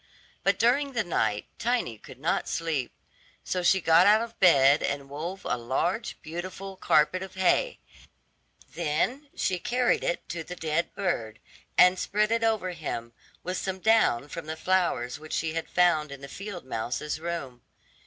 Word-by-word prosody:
But - - +2
during 275 +4 +2
the 235 -3 +1
night 110 - 0
Tiny 230 - -1
could 130 0 -13
not 155 +6 -1
sleep; 155 -7 -2 0.5
so 180 - -2
she 190 +2 +4
got 165 +1 +5
out 215 +2 +5
of 235 0 -10
bed 140 -5 +6
and 140 -1 -2
wove 170 +7 -6
a 125 - 0
large, 175 - -2
beautiful 185 +4 -6
carpet 175 +1 +2
of 190 0 -8
hay; 190 - +2 1.0
then 200 - -1
she 185 -2 0
carried 245 +5 +1
it 170 - -2
to 170 -1 -4
the 180 +3 -8
dead 165 0 -1
bird, 115 - -2 0.4
and 180 0 +6
spread 210 +1 +1
it 230 0 +1
over 220 -5 +1
him; 120 -8 -5 0.3
with 185 +1 -3
some 190 -1 -3
down 190 - +3
from 160 +1 -7
the 160 0 -4
flowers 160 -9 0
which 155 0 -9
she 160 0 -1
had 165 0 -4
found 165 -5 +3
in 140 -1 -9
the 140 - -8
field 195 +1 -7
mouse's 130 +6 -3
room. 160 -7 -5
170 Hz, 165 wpm, -27 LUFS, 150-195 Hz, 1.0 s, bed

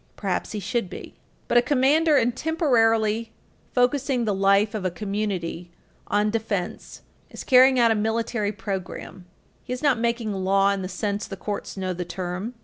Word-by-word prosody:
Perhaps 195 0 -3
he 210 - -3
should 205 0 -2
be. - - -9 0.3
But 240 - +5
a - - +3
commander, 290 +4 +3
in 245 -2 +3
temporarily 230 -7 +1 0.4
focusing 250 0 +1
the 210 - +1
life 195 +2 +3
of 215 -3 -3
a 185 - +1
community 190 -3 -4 0.4
on 210 +1 +1
defense, 210 -5 -4 0.3
is - - -8
carrying 260 0 +6
out 235 -2 +5
a - - +3
military 220 0 -1
program; 190 -3 -6 0.4
he 250 - -9
is 250 - -6
not 275 -5 +3
making 235 -2 -1
law 195 +1 +2
in 200 -1 -2
the 185 - -5
sense 205 +2 -3
the 195 - -7
courts 205 0 -5
know 185 -1 -2
the 180 0 -4
term. 180 +6 -5
215 Hz, 170 wpm, -24 LUFS, 195-240 Hz, 0.4 s, carrying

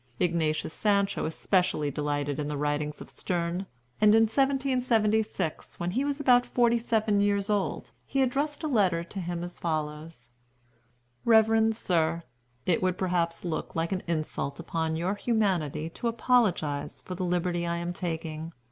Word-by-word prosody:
Ignatius 160 -3 0
Sancho 200 -2 +1
especially 160 -2 +1
delighted 145 0 -2
in 145 - -2
the 150 -1 -3
writings 150 +1 -2
of - - -9
Sterne; 175 +1 -2 0.3
and 210 0 +7
in 225 - +6
1776, 225 - +1
when 175 +1 -1
he 255 +8 0
was 285 0 -2
about 250 -3 +5
forty 235 -1 +2
seven 220 -3 +1
years 200 0 +1
old, 205 -2 -1 0.2
he 270 -1 +2
addressed 285 +4 -1
a - - 0
letter 190 - +2
to 195 +3 -7
him 175 -1 -3
as 175 0 -8
follows: 155 -5 -4 0.9
"REVEREND 220 -1 +4
SIR, 170 -5 0 0.4
It 175 - +2
would 185 -1 +1
perhaps 175 -2 -1
look 165 -2 -3
like 165 +2 -1
an 190 -1 -1
insult 155 -3 -2
upon 160 -1 -2
your 175 +4 0
humanity 190 - 0
to 235 - -3
apologize 220 - +1
for 185 - -6
the 185 +1 -4
liberty 175 -1 0
I 170 - 0
am 170 +1 -3
taking. 165 -2 -4
180 Hz, 155 wpm, -28 LUFS, 160-220 Hz, 0.9 s, and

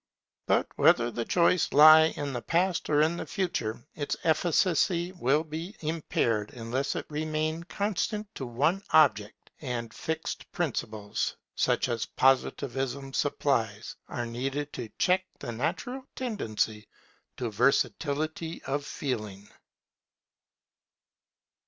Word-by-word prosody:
But - - +3
whether 120 0 +4
the 115 0 -3
choice 175 0 +3
lie 155 +2 +9
in 145 -3 -4
the 120 - -3
Past 175 +5 0
or 150 0 +4
in 165 +2 +1
the - - -4
Future, 120 - -2
its 145 -2 -2
efficacy 170 +1 +2
would 155 -2 0
be 165 +6 -5
impaired 130 -9 0
unless 125 +4 -2
it - - -3
remained 155 +2 -2
constant 210 +1 -1
to 130 - -5
one 150 +11 +1
object; 110 -10 +3
and 120 -5 -4
fixed 160 0 -4
principles, 110 -10 -2 0.2
such - - +1
as 115 -2 -2
Positivism 135 0 0
supplies, 115 -8 0
are 120 - -3
needed 135 +5 -3
to 120 -3 -5
check 185 +1 +3
the - - -6
natural 245 - -3
tendency 110 - -2 0.5
to 120 -3 -3
versatility 155 +6 0
of 140 +1 -2
feeling. 105 -9 -4
145 Hz, 115 wpm, -28 LUFS, 120-165 Hz, 0.5 s, lie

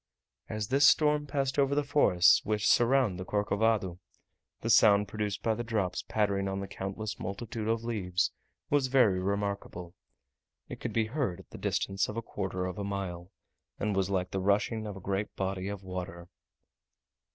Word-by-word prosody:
As 105 -1 -3
this 135 +2 +5
storm 150 -1 +3
passed 140 -1 -1
over 140 0 +3
the 145 - +2
forests 90 -11 +4
which 105 0 0
surround 120 -6 +3
the - - -3
Corcovado, 105 -2 0 0.6
the 115 - -2
sound 105 -2 +6
produced 105 0 -3
by 115 - +2
the 120 - -3
drops 110 -6 -1
pattering 100 -2 0
on 95 0 -2
the 100 - -5
countless 100 +2 -5
multitude 110 +3 -5
of 115 0 0
leaves 95 -6 -1 0.4
was 140 -2 +3
very 125 -8 +4
remarkable, 100 -3 -3 0.7
it - - -8
could - - -4
be 115 -1 +1
heard 120 - -2
at - - -16
the - - -9
distance 95 0 -1
of 105 - -5
a 115 - -2
quarter 95 -3 -3
of 90 +1 -5
a - - -2
mile, 95 -3 -4 0.5
and 105 -1 -1
was 95 0 +1
like 90 -2 -1
the 95 - -1
rushing 105 +3 +1
of 100 -2 -6
a - - -10
great 100 +3 -3
body 95 0 -2
of 100 -1 -5
water. 90 -2 -6
100 Hz, 175 wpm, -30 LUFS, 95-115 Hz, 0.7 s, sound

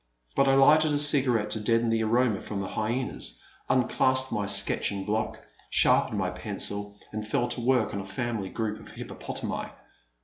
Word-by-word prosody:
But 140 - +3
I 135 - +4
lighted 150 +3 +5
a - - +2
cigarette 135 -7 +2
to 110 - +1
deaden 115 +2 +1
the 115 0 +1
aroma 115 -1 +1
from 105 - -5
the 95 - -4
hyenas, 120 +4 -2 0.3
unclasped 130 +1 +2
my 105 -1 -2
sketching 100 0 +2
block, 110 +1 -2 0.3
sharpened 105 - +3
my 95 -2 -1
pencil, 100 +2 -3
and 110 0 -5
fell 120 +3 0
to 120 0 -1
work 125 -2 +1
on 100 - -3
a - - -7
family 105 0 -4
group 110 0 -3
of - - -13
hippopotami. - - -5
110 Hz, 170 wpm, -27 LUFS, 105-130 Hz, 0.3 s, lighted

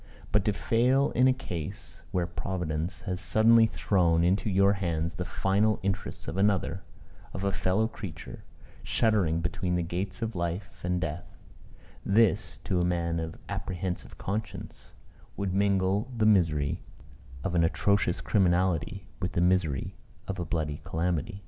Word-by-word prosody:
But 105 -1 +3
to 105 - +3
fail 125 +7 +2
in 125 +2 +4
a - - +6
case 90 - -6
where 90 -2 0
Providence 85 -1 -3
has 90 -2 -3
suddenly 115 +1 +5
thrown 85 -1 +2
into 95 +4 +2
your 100 +1 +4
hands 85 -3 -1
the 90 +1 -4
final 100 +4 +1
interests 100 +1 -3
of 85 - -4
another 95 -2 +1 0.5
of 95 - -4
a 100 - +1
fellow 100 +3 +1
creature 100 -7 -8 0.4
shuddering 95 -8 +1
between 90 +1 -1
the 90 - +1
gates 95 +5 -4
of 115 -2 -3
life 90 +3 -4
and 90 0 0
death; 80 -1 -5 0.7
this, 105 +1 +2
to 90 -3 0
a - - +2
man 85 -1 0
of 80 0 -5
apprehensive 90 0 -4
conscience, 105 +1 -5 0.4
would 100 -1 -1
mingle 100 +3 +2
the 110 - +2
misery 80 -9 +3 0.6
of 95 - -2
an 85 -1 +3
atrocious 95 +2 +1
criminality 95 -1 +1
with 90 -1 -2
the - - 0
misery 90 -6 +1 0.3
of 95 -1 -4
a 85 - -2
bloody 75 -2 -2
calamity. 85 +4 -2
95 Hz, 150 wpm, -28 LUFS, 85-100 Hz, 0.7 s, a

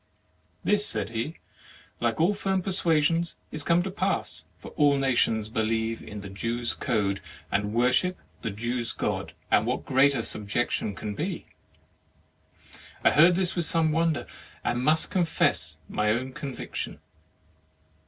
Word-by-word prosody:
"This," 210 0 +3
said 110 - -1
he, 120 +8 -3 0.6
"like 115 +2 0
all 175 +6 +4
firm 190 -2 -1
per 195 - -2
suasions, 165 -1 +2 0.2
is 155 - -3
come 170 +2 +3
to 190 - -4
pass, 200 - -1
for - - -10
all 145 -1 +3
nations 120 -5 +2
believe 110 0 -1
the 105 -1 -8
Jews' 115 +5 -2
code, 100 -5 0 0.3
and 105 0 0
worship 125 +11 +2 0.2
the 115 - -2
Jews' 120 +3 -3
God; - - -2 0.2
and - - +4
what - - -1
greater 135 -2 +3
subjection 105 -1 -1
can 105 +1 -4
be?" - - -3 1.6
I - - +6
heard 170 +4 +6
this 185 -1 +2
with 175 -2 +1
some 160 -1 +3
wonder, 165 -1 +1 0.4
and 120 +1 0
must 155 +3 +3
confess 160 - +1
my 105 0 0
own 130 +4 -1
conviction. 135 -2 -5
130 Hz, 140 wpm, -27 LUFS, 110-165 Hz, 1.6 s, I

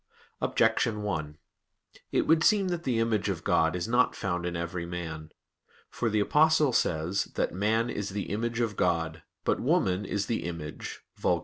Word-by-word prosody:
Objection 110 -1 +2
1: 75 -7 -3 0.7
It - - +2
would 160 0 +4
seem 200 -2 +4
that 175 -1 -3
the 125 -3 +1
image 115 -2 +1
of - - -3
God 80 +1 +2
is 90 +3 -2
not 120 +2 +3
found 90 -2 -2
in 85 - -3
every 85 +1 -3
man. 80 -3 -5 0.6
For 115 - -1
the 105 0 +1
Apostle 150 +4 +4
says 85 0 +1
that - - 0
"man 110 +5 +1
is 105 -1 -3
the 100 -1 -4
image 115 +3 -1
of 110 -3 -1
God, 80 -3 0 0.2
but - - +1
woman 95 +2 +1
is 100 0 -2
the 115 -4 -2
image 85 -3 -6 0.2
[Vulg. - - +2
100 Hz, 175 wpm, -28 LUFS, 85-115 Hz, 0.7 s, would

